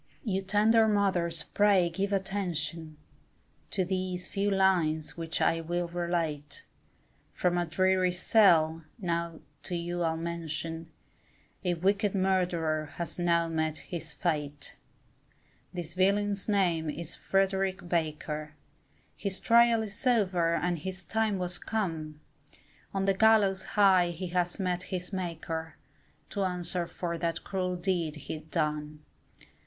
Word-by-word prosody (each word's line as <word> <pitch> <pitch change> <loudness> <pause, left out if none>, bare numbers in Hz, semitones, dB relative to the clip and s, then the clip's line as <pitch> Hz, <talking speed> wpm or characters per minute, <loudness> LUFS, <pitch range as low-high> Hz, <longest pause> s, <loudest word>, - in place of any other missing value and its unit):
You 195 -6 0
tender 215 +3 +4
mothers 185 -6 +2
pray 200 -4 +4
give 195 +4 -1
attention, 175 -5 -2 0.7
To 190 -2 0
these 185 -1 -2
few 200 +1 0
lines 180 -6 +2
which 165 -1 -3
I 165 - +2
will 175 +1 -2
relate, 170 -4 -2 0.7
From 180 -1 +1
a 175 -1 0
dreary 185 +2 +2
cell, 170 -4 +4
now 170 -4 -2 0.2
to 180 - -3
you 175 +1 -3
I'll 160 -1 +1
mention, 165 0 -4 0.7
A 175 -1 +1
wicked 200 +3 +1
murderer 175 -5 +1
has 170 +1 -4
now 170 -1 +2
met 160 -1 -1
his 165 -1 -5
fate; 150 -4 -2 1.0
This 175 -2 -5
villain's 200 +2 +1
name 175 -6 +2
it 150 - -4
is 170 -2 -5
Frederick 195 -1 0
Baker, 155 -2 -2 0.6
His 195 -2 -3
trial 235 -1 +5
is 210 +4 -4
over 185 -8 +3
and 175 +1 0
his 190 +3 -5
time 220 0 0
was 180 -1 -2
come! 160 -8 -3 0.7
On 195 0 -1
the 195 - +3
gallows 200 -2 +4
high 190 -3 +6
he 175 +1 -5
has 175 +1 0
met 180 -2 0
his 180 0 -4
Maker, 165 -3 -4 0.6
To 200 - -1
answer 180 -1 -1
for 170 -1 -4
that 170 -1 -1
cruel 185 -2 -2
deed 175 -4 -1
he'd 155 +1 -7
done. 150 -2 -2
175 Hz, 130 wpm, -29 LUFS, 165-195 Hz, 1.0 s, high